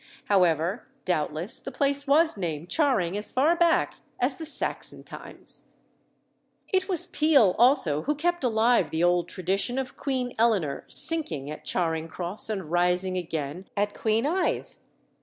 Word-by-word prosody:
However, 180 - +1 0.2
doubtless, 165 +3 -1
the 270 - -7
place 280 +2 +1
was 315 +4 +5
named 170 -4 -4
Charing 240 - +1
as 210 +1 -4
far 300 +7 +3
back 340 -1 +2 0.2
as 255 +2 +1
the 320 - -5
Saxon - - -3
times. - - -7 1.0
It 375 0 0
was 355 -2 +1
Peele 300 - +3
also 230 - +4
who 295 +3 -1
kept 345 +2 -1
alive 235 0 +3
the 160 +1 -1
old 175 0 +2
tradition 195 +7 -1
of 265 -1 -4
Queen 255 -3 -2
Eleanor 195 -12 +1
sinking 165 - 0
at 155 - -9
Charing 165 -2 -1
Cross 180 +6 -2
and 190 -7 -4
rising 180 +1 +1
again 165 0 -4
at 205 0 0
Queenhithe. 280 - 0
210 Hz, 140 wpm, -26 LUFS, 175-280 Hz, 1.0 s, was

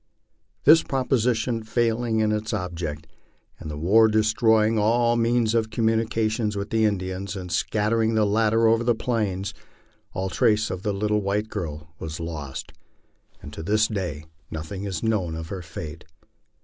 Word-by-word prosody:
This 160 +3 +8
proposition 125 -3 0
failing 115 0 0
in 110 0 +2
its 110 0 -2
object, 80 -4 -4 0.5
and 80 - -7
the 75 - -5
war 105 +8 +5
destroying 110 0 +3
all 120 +2 +3
means 115 -1 +2
of 115 -1 +1
communication 110 0 0
with 100 +1 -4
the 110 -1 +3
Indians 95 -1 -2
and 90 -2 -6
scattering 110 +3 +1
the 110 -1 +3
latter 110 +2 +3
over 115 +1 +3
the 120 0 +2
Plains, 105 -4 -2 0.6
all 95 +1 -2
trace 105 +3 +2
of 95 -1 -4
the 105 - -1
little 105 +1 0
white 105 +2 -1
girl 80 -3 -6
was 80 0 -6
lost, 75 -5 -6 0.7
and 75 - -9
to 80 - -6
this 105 +5 +2
day 90 -8 -4 0.2
nothing 80 +6 -6
is 95 -4 -4
known 100 -8 0
of 80 0 -6
her 95 -2 -5
fate. 80 -1 -8
105 Hz, 155 wpm, -24 LUFS, 90-115 Hz, 0.7 s, This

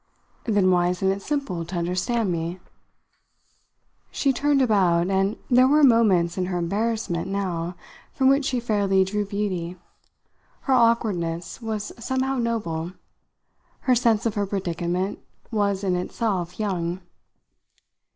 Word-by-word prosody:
"Then 205 -5 +3
why 175 -1 +3
isn't 180 +2 +1
it 195 +1 -3
simple 275 - -2
to 170 +3 -7
understand 180 +5 0
me?" 170 +2 -3 1.5
She 275 -2 +1
turned 285 +2 +2
about, 190 -7 +3
and 195 +2 +1
there 255 +1 +5
were 300 +2 +4
moments 195 -9 +4
in 180 - 0
her 180 -1 -2
embarrassment, 200 0 -1
now, 180 -3 -2 0.4
from 265 - +1
which 275 +1 +4
she 255 -2 0
fairly 200 -4 +2
drew 205 +2 -2
beauty. 185 -4 -3 0.8
Her 270 - 0
awkwardness 205 -8 +1
was 215 -2 -4
somehow 260 +1 0
noble; 185 -8 -2 0.9
her 255 - +3
sense 230 -3 +2
of 225 - +1
her 205 -1 -1
predicament 185 0 -2 0.3
was 200 -3 0
in 185 -2 +1
itself 180 -1 -2
young. 180 -3 -2
195 Hz, 130 wpm, -24 LUFS, 180-230 Hz, 1.5 s, there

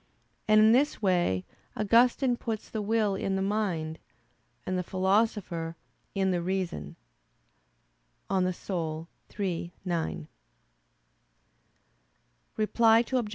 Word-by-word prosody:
And 215 0 +6
in 215 +1 +7
this 275 +5 +3
way 175 - +1 0.3
Augustine 240 +4 +3
puts 225 -2 -5
the 220 - -2
will 215 -1 +1
in 195 0 -1
the 190 - 0
mind; 180 -6 -1 0.7
and 185 - -1
the 180 - 0
Philosopher, 190 -3 0 0.4
in 190 -1 +2
the 175 -1 0
reason 175 - -3 1.3
(De - - -4
Anima 175 -3 -2 0.3
iii, 175 -3 -2
9). 165 - -2 2.3
Reply 225 +1 +4
Obj. 240 -5 +1
195 Hz, 105 wpm, -28 LUFS, 175-220 Hz, 2.3 s, in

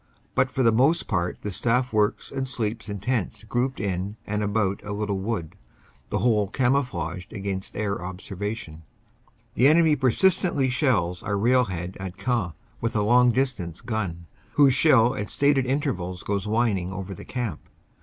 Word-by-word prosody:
But 130 - +2
for 130 +1 0
the 115 - +5
most 135 +9 +3
part 90 -3 -2
the 105 - -3
staff 125 +5 0
works 105 -1 +1
and 135 0 -3
sleeps 110 -3 -3
in 100 - -3
tents 120 -3 -2
grouped 125 +5 -1
in 100 +1 -2
and 105 +1 -2
about 100 -1 0
a 105 0 -5
little 100 -1 -2
wood, 95 -5 -3 0.5
the - - 0
whole 110 -4 +2
camouflaged 100 - -1
against 95 -2 -4
air 100 -2 -2
observation. 95 -2 -5 0.7
The 125 - +4
enemy 160 0 +5
persistently 140 - +2
shells 115 - +1
our 100 -1 -1
railhead 100 -6 +1
at 95 -1 -6
Queant 115 -10 -1 0.3
with 115 0 -1
a 105 - +2
long 125 +3 +5
distance 120 -11 -1
gun, 100 -8 -3 0.3
whose 140 -3 +5
shell 125 -4 +5
at 105 -5 -4
stated 140 -2 +2
intervals 105 - -2
goes 100 -2 -2
whin 110 -2 +2
ing 90 +1 -5
over 95 0 -5
the - - -10
camp. 120 - -5
110 Hz, 165 wpm, -25 LUFS, 95-125 Hz, 0.7 s, the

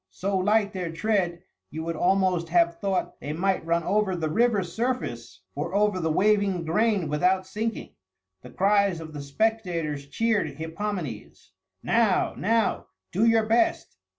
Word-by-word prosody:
So 195 +1 -3
light 205 +2 +2
their 180 -3 -3
tread, 175 -1 -1 0.3
you 160 +1 -6
would 165 0 -3
almost 180 -1 +1
have 170 0 +2
thought 195 -1 -2
they 150 - -5
might 190 +3 0
run 170 +1 0
over 205 0 +1
the 160 -3 -2
river 225 -1 +2
surface 170 - -4
or 165 +6 -4
over 205 -2 +2
the 160 -2 -1
waving 200 -1 +2
grain 200 +1 +1
without 180 +6 +1
sinking. 215 +4 -4 0.5
The 125 - -12
cries 200 +3 +2
of 160 -1 -9
the 145 - -6
spectators 165 -3 -1
cheered 205 -4 0
Hippomenes, 160 - -5 0.3
"Now, 225 -5 +2
now, 225 +2 0 0.2
do 210 +6 +2
your 225 -1 +4
best! 235 +10 +1
185 Hz, 150 wpm, -26 LUFS, 165-210 Hz, 0.5 s, your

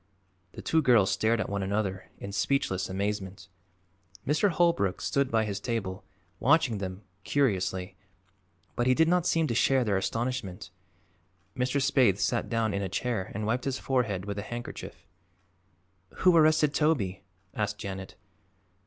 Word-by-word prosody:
The - - -9
two 160 - +2
girls 120 -8 +4
stared 115 +1 +1
at 110 - -1
one 100 0 -2
another 95 -1 -2
in 100 - -7
speechless 100 -3 0
amazement. 95 0 -3 0.8
Mr. 155 +8 +2
Holbrook 165 - +1
stood 140 -1 0
by 110 -2 +2
his 100 -1 -3
table, 100 -4 -3 0.4
watching 135 -5 +3
them 95 +1 -6 0.2
curiously, 95 -8 0 0.8
but 120 - 0
he 130 - +4
did 160 +3 +4
not 175 0 +2
seem 165 -1 +2
to 120 - -1
share 130 +2 +3
their 105 -4 +1
astonishment. 105 -2 -3 0.8
Mr. 125 +3 0
Spaythe 130 -7 +3
sat 120 +3 0
down 115 -3 0
in 100 - -1
a 95 - -3
chair 110 0 -2
and 110 +1 -2
wiped 120 +4 -1
his 135 -2 -1
forehead 110 -8 -1
with 100 0 -4
a - - -2
handkerchief. 120 +3 -7 1.2
"Who 180 -2 +7
arrested 155 -2 +4
Toby?" 130 - +1 0.3
asked 105 -1 -2
Janet. 95 -2 -6
110 Hz, 150 wpm, -28 LUFS, 100-135 Hz, 1.2 s, Who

